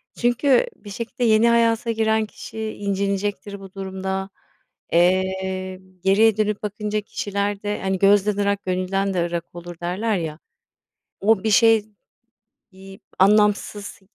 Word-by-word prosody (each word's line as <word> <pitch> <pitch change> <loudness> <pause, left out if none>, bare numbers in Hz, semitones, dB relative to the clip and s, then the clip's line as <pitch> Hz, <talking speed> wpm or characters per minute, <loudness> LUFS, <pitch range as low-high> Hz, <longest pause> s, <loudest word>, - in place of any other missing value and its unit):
çünkü 250 - +2
bir 205 - -13
şekilde 235 +4 -5
yeni 225 0 +4
hayata 230 0 +2
giren 220 -1 +1
kişi 220 +1 -10
incinecektir 200 0 -2
bu 195 -1 -12
durumda, 190 0 -4 0.6
eee, 185 +1 +1 0.2
geriye 210 +3 +4
dönüp 210 -1 -1
bakınca 210 +1 -2
kişilerde, 205 0 -3
hani, 190 -1 -1
gözden 205 +1 +4
ırak 200 0 0
gönülden 190 +2 -1
de 175 -2 0
ırak 170 -1 -3
olur 175 0 -8
derler 200 +5 -1
ya, 160 -2 -5 0.8
o 210 0 +2
bir 220 - +1
şey, 225 0 +5 0.9
iii, 195 +1 -13 0.2
anlamsız 205 +1 +2
200 Hz, 125 wpm, -22 LUFS, 190-215 Hz, 0.9 s, şey